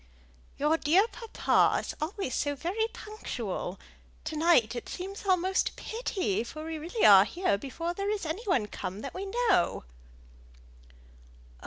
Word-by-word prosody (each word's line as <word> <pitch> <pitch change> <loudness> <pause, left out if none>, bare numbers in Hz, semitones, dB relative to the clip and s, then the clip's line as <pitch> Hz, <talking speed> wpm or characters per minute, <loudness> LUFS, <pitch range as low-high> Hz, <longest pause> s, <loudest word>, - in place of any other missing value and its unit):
"Your 300 +3 +2
dear 355 +8 +4
papa 460 -1 +2
is - - -6
always 340 - -3
so 290 -1 0
very 375 +10 -1
punctual! 235 - -5 0.4
To 310 0 -4
night 300 -8 +4
it 240 - -6
seems 390 +2 -6
almost 375 0 +2
a - - -19
pity, 375 - -2
for 310 +6 -8
we 320 -1 -4
really 350 +9 0
are 195 -2 +9
here 350 - 0
before 330 +10 -4
there 395 +2 -2
is 415 -4 -2
any 320 +8 -3
one 265 - +2
come 200 -1 -6
that - - -6
we 385 +2 -5
know." 425 -4 +1
340 Hz, 150 wpm, -29 LUFS, 275-395 Hz, 0.4 s, are